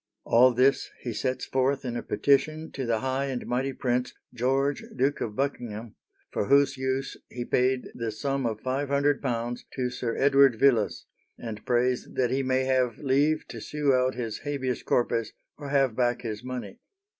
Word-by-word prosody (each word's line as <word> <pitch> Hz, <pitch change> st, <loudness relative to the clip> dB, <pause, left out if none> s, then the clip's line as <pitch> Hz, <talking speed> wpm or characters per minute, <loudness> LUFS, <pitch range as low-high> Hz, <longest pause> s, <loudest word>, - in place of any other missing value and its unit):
All 125 Hz, +2 st, +5 dB
this 130 Hz, +3 st, +2 dB
he 120 Hz, -, -4 dB
sets 130 Hz, +4 st, -2 dB
forth 135 Hz, +1 st, 0 dB
in 120 Hz, -1 st, -3 dB
a 120 Hz, -, -2 dB
petition 155 Hz, +3 st, +1 dB
to 135 Hz, -3 st, -4 dB
the 115 Hz, -2 st, +1 dB
high 130 Hz, +1 st, -1 dB
and 130 Hz, -3 st, -4 dB
mighty 130 Hz, +3 st, -1 dB
prince, 125 Hz, -1 st, -1 dB, 0.2 s
George, 135 Hz, +4 st, 0 dB
Duke 135 Hz, +3 st, +1 dB
of 105 Hz, -2 st, -3 dB
Buckingham, 120 Hz, -5 st, -3 dB, 0.4 s
for -, -, -1 dB
whose 140 Hz, +2 st, +4 dB
use 130 Hz, +1 st, -2 dB
he 120 Hz, -1 st, -5 dB
paid 130 Hz, +1 st, +1 dB
the 115 Hz, -1 st, -3 dB
sum 135 Hz, +3 st, -1 dB
of 110 Hz, -2 st, -4 dB
£500 135 Hz, -3 st, 0 dB, 0.2 s
to 125 Hz, -2 st, -1 dB
Sir 125 Hz, -2 st, -3 dB
Edward 135 Hz, -4 st, +5 dB
Villiers, 120 Hz, -7 st, +3 dB, 0.3 s
and 110 Hz, -2 st, -7 dB
prays 125 Hz, +1 st, +1 dB
that 125 Hz, -2 st, +1 dB
he 135 Hz, +1 st, +1 dB
may 130 Hz, 0 st, +1 dB
have 130 Hz, -3 st, +1 dB
leave 145 Hz, +3 st, +1 dB
to -, -, -7 dB
sue 150 Hz, -2 st, +1 dB
out 130 Hz, 0 st, +2 dB
his 115 Hz, -3 st, -4 dB
Habeas 135 Hz, -4 st, -2 dB
Corpus, 115 Hz, -2 st, 0 dB, 0.2 s
or 145 Hz, -2 st, -8 dB
have 135 Hz, -5 st, +2 dB
back 120 Hz, 0 st, +1 dB
his 110 Hz, -1 st, -5 dB
money. 125 Hz, -6 st, -6 dB
130 Hz, 170 wpm, -27 LUFS, 120-135 Hz, 0.4 s, All